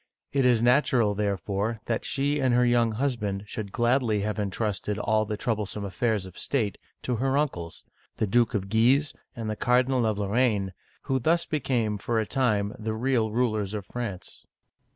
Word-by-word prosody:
It 135 -2 +3
is 120 -2 +3
natural, 120 -4 +3
therefore, 100 +2 -1
that 115 - -2
she 145 +2 0
and 130 -3 +2
her 125 0 +4
young 120 -2 +3
husband 110 -6 -1
should 105 -1 -6
gladly 120 -3 +2
have 105 +1 -2
intrusted 105 0 -2
all 110 +1 +1
the 105 0 -3
troublesome 105 -2 -2
affairs 105 +1 -1
of 95 -1 -11
state 110 -8 -1 0.2
to 125 -2 -1
her 135 +3 +1
uncles, 90 - -2 0.3
the - - +1
Duke 115 +3 +2
of 95 -2 -1
Guise 125 +8 +3 0.2
and 115 -2 -5
the 110 - -2
Cardinal 125 +1 +2
of 110 -2 0
Lorraine, 105 -2 +1 0.3
who 135 0 0
thus 165 +7 +2
became, 120 -8 -1
for 115 +2 0
a 110 - 0
time, 105 -5 0
the 110 0 -3
real 120 -1 +1
rulers 110 -4 0
of 100 -2 -5
France. 115 -6 -6
110 Hz, 170 wpm, -27 LUFS, 105-125 Hz, 0.3 s, her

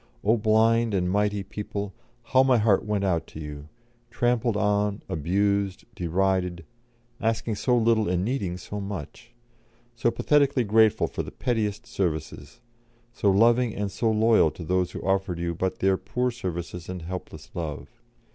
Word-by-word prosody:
O 110 +3 +4
blind 110 0 +3
and 90 -1 0
mighty 105 0 +1
people, 100 -1 -5 0.3
how 130 +3 +4
my 130 -2 +4
heart 105 -3 +3
went 105 -2 -1
out 85 -4 0
to - - -10
you; 75 -1 -8 0.4
trampled 120 -2 +1
on, 105 0 0
abused, 100 +4 0
derided, 90 0 0 0.6
asking 115 0 0
so 125 +4 +1
little 115 -3 +2
and 90 +1 0
needing 100 -8 -2
so 105 +2 -6
much; 100 - -7 0.6
so 120 0 +2
pathetically 140 0 +2
grateful 110 0 +4
for - - -4
the - - -7
pettiest 110 -5 -2
services; 80 +1 -4 0.5
so 105 - +1
loving 115 +4 +4
and 100 -1 -2
so 115 - 0
loyal 110 -5 +4
to 85 - -9
those 90 +2 0
who - - -7
offered 95 -2 0
you 85 0 -2
but 95 +3 -2
their 95 0 +2
poor 125 +7 -1
services 90 -5 -5
and 90 -2 -5
helpless 80 -3 -7
love. 80 -4 -5
100 Hz, 155 wpm, -26 LUFS, 90-115 Hz, 0.6 s, O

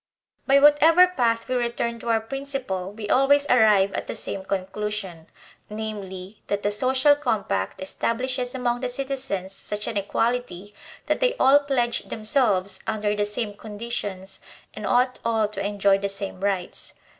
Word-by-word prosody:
By 275 0 +6
whatever 295 +5 +7
path 235 -9 0
we 255 - -2
return 235 -1 -1
to 235 - -5
our 225 -1 +3
principle 255 -7 -4
we 210 0 -7
always 280 +4 +4
arrive 210 -5 +5
at - - -4
the - - -4
same 195 - -5
conclusion, 190 -3 -4 0.4
viz, 205 -3 -6
that 205 0 -2
the 205 - +1
social 260 +6 +3
com 245 -8 -1
pact 95 -1 -2
establishes 250 +6 -2
among 245 -1 0
the 255 0 -2
citizens 260 -8 -4
such 210 +1 -5
an 215 - -3
equality 205 -2 -2 0.3
that - - 0
they - - +2
all 275 - +6
pledge 260 -5 0
themselves 210 -5 0
under 210 -1 0
the 205 0 0
same 210 0 -3
conditions 205 -3 -6 0.3
and - - -5
ought 250 +1 +2
all 225 -2 +1
to 210 - -5
enjoy 200 -1 +2
the 200 0 -2
same 195 -1 -6
rights. 195 -2 -3
220 Hz, 155 wpm, -24 LUFS, 200-255 Hz, 0.4 s, whatever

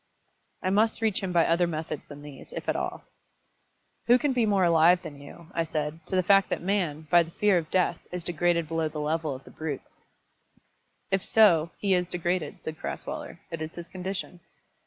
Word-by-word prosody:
I 185 - +1
must 220 +3 +2
reach 215 -3 +1
him 190 -2 -2
by 170 -2 +4
other 170 +1 +3
methods 155 -2 -4
than 145 0 -11
these, 145 -2 -11
if - - -6
at - - +1
all. - - -3 1.0
"Who 240 +1 +7
can 280 +1 0
be 240 -3 +2
more 200 -2 +3
alive 170 +1 +5
than 145 -4 -9
you," 170 +4 -13
I 165 - +1
said, 155 0 -3
"to - - -2
the 185 - +3
fact 195 +1 +5
that - - -1
man, 175 -5 -1
by 175 -1 +7
the 165 - -4
fear 205 +3 +2
of 160 -1 -8
death, 185 -1 +1
is 180 -1 -4
degraded 170 0 +1
below 165 0 0
the 155 - -6
level 155 -1 -1
of 130 - -11
the - - -14
brutes?" 155 -3 -5 1.2
"If 195 -1 +1
so, 170 -8 +5
he 200 -2 +1
is 180 -1 +1
degraded," 175 -3 -2
said 155 0 -6
Crasweller. - - -6
"It 165 -1 -5
is 155 +1 -5
his 175 0 -8
condition." 185 -1 -5
170 Hz, 200 wpm, -27 LUFS, 155-185 Hz, 1.2 s, Who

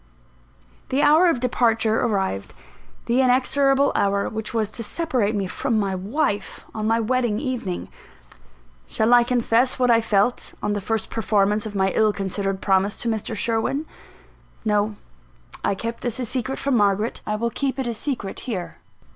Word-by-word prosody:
The 270 +3 +1
hour 310 +5 +6
of 330 -8 +2
departure 230 -3 +2
arrived; 190 - -1 0.5
the 245 +3 +2
inexorable 270 +2 +3
hour 200 0 +1
which 220 0 -4
was 220 -2 -1
to 230 - -5
separate 240 -5 0
me 200 -1 -1
from 220 +4 -1
my 195 -2 -1
wife 205 +2 -2
on 215 -1 -2
my 225 +1 +2
wedding 235 -2 0
evening. 245 -9 -3 1.0
Shall 220 +2 +2
I 240 0 +7
confess 245 0 +2
what 250 -2 +3
I 230 0 +5
felt, 220 +2 +1
on 210 - 0
the 205 - -2
first 220 +2 -2
performance 210 0 +1
of 205 - -8
my 190 -1 +2
ill 215 +1 +2
considered 195 0 -3
promise 195 +1 +1
to 235 - 0
Mr. 220 0 -3
Sherwin? 230 +7 -1 0.8
No: 210 0 +1 0.7
I - - +1
kept 230 +4 -5
this 240 0 -3
a 250 - -1
secret 260 +2 -3
from 280 -2 0
Margaret; 205 +2 +1
I 210 - 0
will 235 +2 -1
keep 270 +2 -2
it 265 - -2
a 235 - -2
secret 230 -4 -4
here. 185 -6 -4
225 Hz, 165 wpm, -23 LUFS, 205-250 Hz, 1.0 s, I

